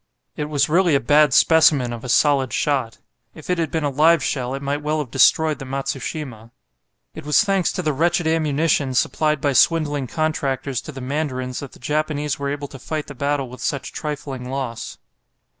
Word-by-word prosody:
It 150 - -3
was 145 -2 +1
really 170 -1 +3
a - - +4
bad 145 +3 +4
specimen 140 -4 +4
of 115 - -8
a 125 - -6
solid 135 -1 +3
shot. 135 -6 -1 0.4
If 160 +3 -6
it 180 - 0
had 165 - 0
been 160 -2 -2
a 145 - 0
live 155 +2 +4
shell, 130 0 -2
it 135 - -6
might 140 +1 -2
well 150 +1 -1
have 145 -6 -4
destroyed 155 +3 +3
the 135 - -7
"Matsushima." 135 -3 -5 0.6
It - - -9
was 150 +8 +3
thanks 195 -4 +1
to 180 - -3
the 155 -2 0
wretched 170 +4 +1
ammunition 155 -3 +1
supplied 150 +3 +1
by 140 0 0
swindling 145 -2 +2
contractors 140 -3 -2
to - - -9
the 135 -2 -9
mandarins 130 -2 -3
that 140 - -9
the - - -14
Japanese 150 +1 -2
were 140 0 -2
able 145 0 -4
to 135 - -11
fight 155 +3 -4
the - - -9
battle 140 0 -1
with 125 +1 -11
such 140 -2 -3
trifling 140 -4 -5
loss. 130 -4 -5
145 Hz, 195 wpm, -21 LUFS, 135-155 Hz, 0.6 s, a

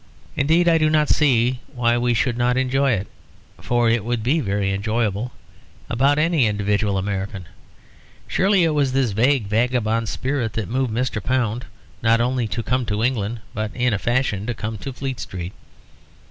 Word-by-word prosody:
Indeed 160 +5 +3
I 165 -1 +5
do 155 0 +3
not 155 -1 +2
see 125 -4 +3
why 120 -2 +2
we 120 0 +1
should 120 +2 +1
not 125 +1 +1
enjoy 135 +1 +2
it 100 -2 -1 0.5
(for 120 -1 +1
it 115 -2 +2
would 120 -1 -2
be 140 +8 +2
very 100 -5 -1
enjoyable) 110 +2 -1 0.6
about 140 +4 +3
any 155 -5 +3
individual 105 -1 0
American. 95 -1 -3 0.8
Surely 190 -1 +3
it 165 - +3
was 140 -3 +1
this 130 -4 +1
vague 120 +3 +2
vagabond 115 +1 0
spirit 130 -4 -2
that 110 -4 -3
moved 130 +1 -1
Mr. 115 -3 -2
Pound, 125 -2 0 0.4
not 115 0 +3
only 125 0 0
to 115 +2 -3
come 125 +2 0
to 105 +1 -1
England, 115 -2 -1
but 110 0 -2
in 125 -1 +1
a 100 - 0
fashion 115 -1 0
to 120 - -2
come 110 0 -5
to 135 - -5
Fleet 130 0 -5
Street. 90 0 -6
120 Hz, 175 wpm, -22 LUFS, 105-130 Hz, 0.8 s, I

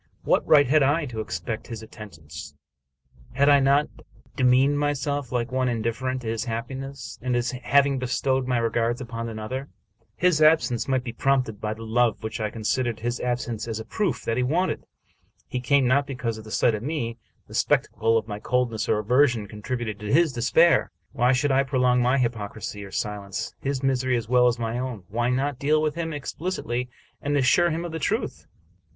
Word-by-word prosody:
What - - +2
right 145 -2 +7
had 150 +4 +4
I 145 +4 +2
to 120 -5 -6
expect 105 +2 -4
his 115 -2 -7
attend 105 -6 -11
ance? 75 -1 -10 0.8
Had 140 +3 +3
I 145 -1 +7
not 140 +2 +3 0.5
demeaned 130 +2 +4
myself 145 -2 -1
like 120 -1 -1
one 130 -1 +1
indifferent 120 +3 -2
to - - -5
his 115 +2 -2
happiness, 130 +4 -6
and 125 0 -1
as 120 0 0
having 135 +2 +2
bestowed 130 +1 0
my 125 -1 +1
regards 115 0 0
upon 115 -2 -5
another? 115 +5 -5 0.5
His 180 -3 +2
absence 140 -7 +4
might 130 -2 +1
be 120 -3 -5
prompted 125 -5 0
by 110 0 -2
the 115 - -9
love 115 -1 +1
which 110 +1 -4
I 110 -1 -1
considered 115 +1 -1
his 120 +1 -2
absence 120 -2 -2
as 110 -1 -3
a 110 - -7
proof 180 - -1
that 115 - -1
he - - +2
wanted. 165 +9 0 0.6
He 125 - -3
came 135 +2 +3
not 140 +3 +3
because 120 -5 -3
the 110 - -12
sight 115 +1 +2
of 105 - -3
me, 120 -4 -3 0.3
the - - -14
spectacle 115 0 +2
of 110 - -2
my 105 -1 -5
cold 125 +2 0
ness 110 - -3
or - - +3
aversion, 120 +1 +2
contributed 110 0 -4
to 105 -1 -4
his 155 -1 +4
despair. 160 +8 +4 0.2
Why 125 +1 +2
should 135 +2 +2
I 135 +1 +4
prolong, 125 -2 +2
by 125 +2 +3
hypocrisy 110 -4 -3
or 100 - -9
silence, 100 -2 -4
his 140 -1 -2
misery 130 -2 +1
as 115 -2 -4
well 125 +1 +4
as 120 0 +1
my 115 +1 -2
own? 125 -6 -4
Why 120 +4 0
not 135 +1 -1
deal 150 +3 +3
with 155 -1 0
him 165 0 -3
explicitly, 140 -5 -3 0.3
and 145 0 0
assure 145 +6 +4
him 165 +1 -2
of 170 - -5
the 160 - -4
truth? 215 - -2
125 Hz, 195 wpm, -25 LUFS, 115-140 Hz, 0.8 s, right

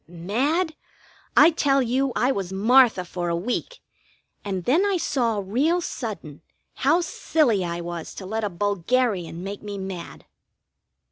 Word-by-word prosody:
Mad? 260 - -1 0.6
I 310 +4 +8
tell 280 -4 +2
you, 260 +3 0
I 255 - +2
was 195 -7 -3
Martha 220 0 +4
for 175 -1 -4
a 170 - 0
week, 245 - -3 0.6
and 190 -3 -3
then 315 +10 +3
I 400 -2 +1
saw, 235 - 0
real 285 - +1
sudden, 200 - -6 0.3
how 310 +6 +2
silly 275 - +1
I 170 0 -3
was 170 -1 -6
to 190 - -7
let 220 +3 -3
a 210 - 0
bulgarian 200 -1 -1
make 200 +1 -6
me 205 -1 -6
mad. 190 -3 -7
215 Hz, 145 wpm, -24 LUFS, 185-275 Hz, 0.6 s, I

